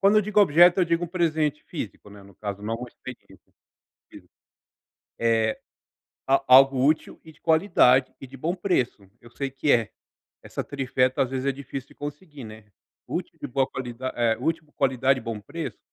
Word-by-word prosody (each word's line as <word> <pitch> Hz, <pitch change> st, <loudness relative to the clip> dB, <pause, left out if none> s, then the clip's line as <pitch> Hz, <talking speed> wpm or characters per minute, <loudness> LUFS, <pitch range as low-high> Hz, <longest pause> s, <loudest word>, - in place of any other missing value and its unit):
Quando 205 Hz, +2 st, +5 dB
eu -, -, +4 dB
digo 210 Hz, +1 st, -1 dB
objeto, 175 Hz, +1 st, +6 dB
eu -, -, +4 dB
digo 170 Hz, +1 st, 0 dB
um -, -, -5 dB
presente 160 Hz, -4 st, 0 dB
físico, 110 Hz, -, -7 dB
né. 100 Hz, 0 st, -13 dB
No 100 Hz, -1 st, -17 dB
caso, 100 Hz, -1 st, -6 dB
não 110 Hz, +2 st, -2 dB
uma 125 Hz, +1 st, -8 dB
experiência 120 Hz, -7 st, -13 dB, 0.6 s
física. -, -, -15 dB, 0.9 s
Eh, 115 Hz, -1 st, +1 dB, 0.7 s
a 135 Hz, +1 st, +2 dB
algo 135 Hz, 0 st, +6 dB
útil 155 Hz, +2 st, +1 dB
e 160 Hz, -, -13 dB
de -, -, -28 dB
qualidade 160 Hz, -7 st, +3 dB
e -, -, -8 dB
de 135 Hz, -, -11 dB
bom 165 Hz, +7 st, -2 dB
preço. 130 Hz, -, -1 dB
Eu 120 Hz, -, -16 dB
sei 135 Hz, +3 st, -4 dB
que 135 Hz, +2 st, +1 dB
é 115 Hz, -3 st, +2 dB, 0.5 s
essa -, -, -5 dB
trifeta 130 Hz, -2 st, 0 dB
às 130 Hz, -, -2 dB
vezes 135 Hz, 0 st, -3 dB
é 140 Hz, -, +2 dB
difícil 135 Hz, 0 st, -8 dB
de -, -, -19 dB
conseguir, 145 Hz, -1 st, -8 dB
né. 110 Hz, -1 st, -11 dB, 0.4 s
Útil -, -, -5 dB
de -, -, -4 dB
boa 135 Hz, +1 st, +1 dB
qualida 130 Hz, 0 st, -5 dB
eh, 115 Hz, -2 st, +2 dB
útil, 160 Hz, +2 st, -2 dB
qualidade 130 Hz, 0 st, +2 dB
e -, -, -14 dB
bom 115 Hz, -2 st, -5 dB
preço, 150 Hz, +1 st, -7 dB
135 Hz, 190 wpm, -25 LUFS, 120-155 Hz, 0.9 s, objeto